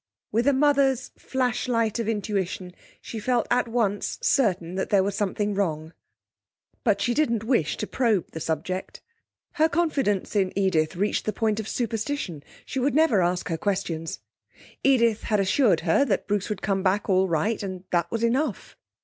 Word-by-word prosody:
With 230 +4 +1
a - - +6
mother's 275 -2 +2
flashlight 245 -3 -1
of 230 - -2
intuition 195 -4 -2 0.3
she 225 - -6
felt 240 +1 +1
at 245 0 +2
once 225 -4 -1
certain 185 -10 +1
there 190 +1 +2
was 200 +1 -1
something 205 +1 -1
wrong, 160 -5 -2 0.9
but 210 -5 +2
she 240 +4 +1
didn't 235 -6 +1
wish 220 - +1
to - - -2
probe 220 -7 0
the 160 - -6
subject. 165 +4 -4 0.5
Her 315 +1 +2
confidence 275 - 0
in 190 -2 +1
Edith 185 -4 +1
reached 205 +4 0
the 215 - -1
point 220 +1 0
of 220 - -4
superstition; 225 - -3 0.2
she 265 - -3
would 265 +2 +1
never 295 -11 +4
ask 175 0 0
her 165 -1 -2
questions. 175 -5 -2 0.6
Edith 235 -5 +3
had 210 -2 +1
assured 195 - +3
her 165 +10 +3
that 200 -8 0
Bruce 205 0 -1
would 210 -3 -4
come 195 -1 0
back 195 +2 +1
all 190 -1 +3
right, 195 +7 0
and 185 -2 -5
that 170 -1 +1
was 230 0 -2
enough. 250 +1 -1
210 Hz, 165 wpm, -25 LUFS, 185-240 Hz, 0.9 s, a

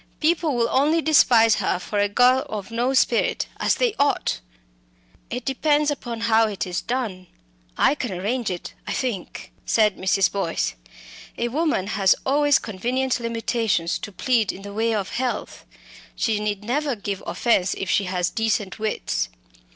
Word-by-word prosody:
People 320 -2 +1
will 235 -1 +2
only 300 +5 +3
despise 240 -8 +5
her - - 0
for 205 +3 -3
a 205 0 +2
girl 250 +4 +4
of 210 0 -6
no 240 +3 0
spirit 240 -2 +2
as - - +2
they - - +1
ought." 285 0 +1 0.9
"It 245 0 -5
depends 295 +2 +2
upon 240 -5 -5
how 225 -1 +4
it 205 -2 -3
is 180 -1 -3
done. 220 -8 -3 0.5
I - - +4
can 255 -6 -4
arrange 210 +6 -2
it, 180 -2 -6
I - - -2
think," 235 -9 -4
said 215 -3 +2
Mrs. 190 +1 +2
Boyce. 175 - -1 0.6
"A 240 - -1
woman 295 - 0
has 195 -2 +3
always 290 +1 +4
convenient 250 +6 -1
limitations 230 -6 -1
to 205 - -7
plead 230 +1 +1
in 195 - -11
the 200 0 -8
way 225 +2 0
of 195 -2 -2
health. 250 0 -3 0.5
She 220 -3 0
need 210 -1 -2
never 275 +4 -1
give 200 -2 -4
offence 195 -6 +1
if 195 - -4
she 200 - +2
has 180 -1 -1
decent 220 -3 -1
wits. 215 - -2
230 Hz, 160 wpm, -23 LUFS, 200-260 Hz, 0.9 s, despise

